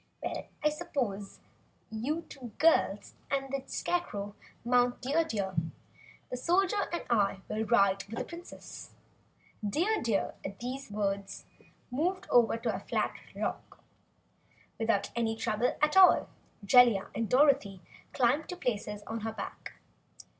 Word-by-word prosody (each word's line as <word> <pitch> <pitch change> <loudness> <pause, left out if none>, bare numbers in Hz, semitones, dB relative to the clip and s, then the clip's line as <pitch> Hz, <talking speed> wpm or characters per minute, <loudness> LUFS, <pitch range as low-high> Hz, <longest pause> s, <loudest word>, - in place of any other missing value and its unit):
"Now - - -4 0.2
suppose 255 - -4 0.5
you 280 +10 -2
two 250 -8 -10
girls 295 -10 +3 0.2
and 270 -1 -1
the 275 - -1
Scarecrow 205 - -2 0.3
mount 245 0 +3
Dear 290 +6 +1
Deer, 205 -10 -2
and 165 0 -1 0.6
the 250 - -2
Soldier 375 +8 +1
and 345 - -2
I 200 -4 +2
will 215 +1 -2
ride 200 -4 +3
with 220 +3 -8
the - - -2
Princess." 345 +1 -10 0.7
Dear 350 - +1
Deer, 220 -4 0
at 195 0 -6
the 245 +1 -3
Wizard's 270 -2 -8
words, 200 -1 -2 0.5
moved 360 +8 -1
over 235 -2 +5
to 230 -1 -1
a 190 - -3
flat - - -1 0.2
rock. - - -5 1.0
Without 225 -3 +1
any 225 -1 0
trouble 220 +2 0
at 300 +3 +3
all, 380 -1 +7 0.4
Jellia 235 -3 +5
and 225 -1 -2
Dorothy 255 -9 +3 0.3
climbed 270 +5 +2
to 360 - -4
places 210 - -3
on 225 0 -4
her 220 0 -4
back. 200 -2 -7
235 Hz, 140 wpm, -31 LUFS, 205-290 Hz, 1.0 s, all